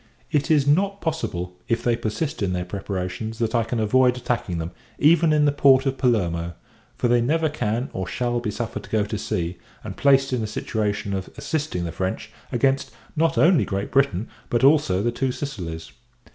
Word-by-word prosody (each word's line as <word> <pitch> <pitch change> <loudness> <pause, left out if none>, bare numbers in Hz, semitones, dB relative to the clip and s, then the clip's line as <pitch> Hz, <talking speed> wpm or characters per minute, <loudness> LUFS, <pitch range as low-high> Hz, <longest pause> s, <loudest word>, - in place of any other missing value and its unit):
It 150 0 +1
is 150 -3 +4
not 195 +7 +2
possible, 90 - -3
if 115 0 0
they 120 -1 +2
persist 140 +8 -3
in 95 -2 0
their 90 0 -2
preparations, 100 +3 -4
that 115 -1 -1
I 115 -1 +3
can 115 +1 -2
avoid 125 +3 +3
attacking 120 -7 -2
them, 80 +1 -4 0.3
even 165 +1 +5
in 150 -1 +4
the 145 - +4
port 135 -1 +5
of 135 -1 -1
Palermo; 85 -9 0 0.4
for - - +1
they 120 0 +3
never 155 +6 +1
can, 120 -3 -2
or 95 -1 -3
shall, 120 +3 -1
be 120 -3 -3
suffered 115 +2 -4
to - - -14
go 110 -1 +2
to 105 +1 -3
sea, 85 -1 -3 0.2
and - - -6
placed 135 -1 +3
in 125 - 0
a 110 - -2
situation 105 -2 -2
of 95 -1 -3
assisting 150 - -2
the 85 - -3
French, 95 +3 -3 0.2
against 135 0 +1 0.3
not 165 +1 +1
only 170 -1 +5
Great 100 0 -3
Britain, 135 -7 +2 0.2
but 120 +1 +1
also 135 -10 +4
the 120 - +1
Two 130 +2 -1
Sicilies. 85 - -6
120 Hz, 195 wpm, -23 LUFS, 100-140 Hz, 0.4 s, even